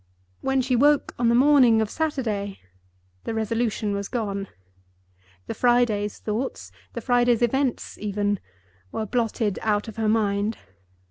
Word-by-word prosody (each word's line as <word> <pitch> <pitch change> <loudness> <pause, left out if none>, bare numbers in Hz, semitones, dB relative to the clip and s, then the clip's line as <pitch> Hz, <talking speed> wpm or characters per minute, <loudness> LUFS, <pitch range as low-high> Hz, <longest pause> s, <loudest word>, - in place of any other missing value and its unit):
When 270 0 +1
she 255 0 +1
woke 290 +3 +3
on 235 -1 +3
the 235 - +4
morning 255 -4 +6
of 220 -1 -1
Saturday, 220 -11 -2 0.7
the 225 - -3
resolution 220 -1 -1
was 200 0 -3
gone. 200 -5 -3 1.0
The - - -4
Friday's 240 -4 +2
thoughts—the 155 - -5
Friday's 245 -1 +3
events 265 +1 -1
even—were 140 - -4
blotted 225 -3 -1
out 210 0 0
of 220 - -9
her 220 -1 +1
mind. 210 0 +1
220 Hz, 125 wpm, -24 LUFS, 205-245 Hz, 1.0 s, morning